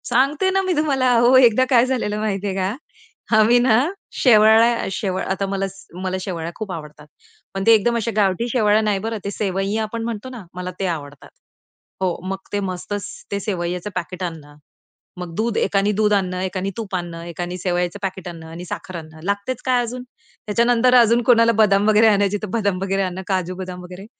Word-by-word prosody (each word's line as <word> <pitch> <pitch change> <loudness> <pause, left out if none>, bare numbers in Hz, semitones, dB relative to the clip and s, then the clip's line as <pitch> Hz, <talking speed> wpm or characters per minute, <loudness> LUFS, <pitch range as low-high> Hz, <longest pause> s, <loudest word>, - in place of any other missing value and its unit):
सांगते 280 +9 +2
ना 385 0 +2
मी 375 -1 0
तुम्हाला. 280 -5 +1
अहो, 240 +2 +5
एकदा 255 0 +5
काय 245 -2 +5
झालेलं 230 -5 -1
माहितीये 200 -2 -2
का? 190 +3 -1 0.6
आम्ही 225 +3 +5
ना 240 -3 +4 0.4
शेवळ्या 225 0 +5
शेवळ्या 190 -2 -2
आता 195 +1 -1
मला 195 0 -1 0.4
मला 185 0 -1
शेवळ्या 170 -3 -4
खूप 215 -3 -6
आवडतात. 150 -3 -9 0.5
पण 195 0 -3
ते 230 - +8
एकदम 225 +2 +3
अशा 230 0 -2
गावठी 205 +2 +1
शेवळ्या 215 -3 +3
नाही 210 -2 0
बरं 225 +2 -3
ते 200 - -2
सेंवंया 195 0 -2
ते - - 0
आपण 225 +1 -4
म्हणतो 230 +1 -5
ना, 245 -5 -9
मला 180 0 -5
ते 195 - -1
आवडतात. 145 -4 -6 0.7
हो. 185 -2 +1
मग 195 0 -2 0.2
ते 205 - +1
मस्तच 195 +1 -4 0.3
ते 200 - -1
शेवयांचे 180 -1 -3
पॅकेट 185 +1 -4
आणणं. 155 -4 -7 0.6
मग 180 -2 -7
दूध 225 +2 -1
एकाने 200 +1 +1
दूध 210 +1 +2
आणणं, 185 -2 0
एकाने 185 +1 -2
तूप 210 -4 -4
आणणं, 170 -2 -5
एकाने 175 +1 -5
शेवयांचे 180 +1 -1
पॅकेट 190 -1 -4
आणणं 165 -2 -8
आणि 170 +2 -8
साखर 185 +1 -7
आणणं 155 -1 -11
लागतेच 200 +6 -2
काय 255 -2 +3
अजून? 245 +1 -5 0.4
त्याच्यानंतर 240 +3 +3
अजून 235 -1 +5
कोणाला 230 -1 +5
बदाम 205 -1 +4
वगैरे 215 +1 +5
आणायचे 205 -1 +2
तर - - -2
बदाम 200 -5 0
वगैरे 195 0 0
आणणं, 185 0 -4
काजू 185 -2 -1
बदाम 180 -1 -7
वगैरे. 180 +2 -10
200 Hz, 190 wpm, -21 LUFS, 185-230 Hz, 0.7 s, ते